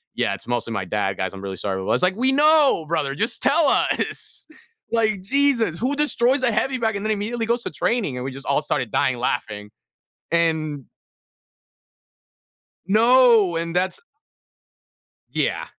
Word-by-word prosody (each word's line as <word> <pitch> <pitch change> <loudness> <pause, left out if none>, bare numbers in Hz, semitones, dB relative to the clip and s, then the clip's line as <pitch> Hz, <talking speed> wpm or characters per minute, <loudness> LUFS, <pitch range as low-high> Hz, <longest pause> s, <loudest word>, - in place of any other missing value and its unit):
"Yeah, - - 0
it's - - -9
mostly 120 -2 -2
my 100 -3 -3
dad, 95 0 -2
guys, 95 +1 -3
I'm 95 - -9
really 95 -1 -6
sorry 95 +2 -3
about" - - -6
I - - +3
was - - 0
like, 185 +1 +2
"We 260 +3 +2
know, 295 - +4
brother, 145 -4 -1
just 225 - -1
tell 295 +2 +3
us!" - - -1 0.5
Like, 215 -4 +1
Jesus, 235 - +1
who 265 +5 -1
destroys 270 -3 +1
a 240 - +3
heavy 260 +4 0
bag 220 -3 -1
and 200 +1 -4
then 220 - 0
immediately 225 +3 -2
goes 235 +1 0
to - - -5
training, 205 - -1
and 125 - -4
we 135 - -4
just 135 +1 -10
all 140 - +1
started 125 -6 -2
dying 125 -2 +1
laughing, 105 -4 -3 0.6
and 160 -4 0 2.0
No, 225 -3 +5
and 165 +1 -3
that's 185 +1 -1 1.3
Yeah. - - -1
195 Hz, 165 wpm, -22 LUFS, -, 2.0 s, No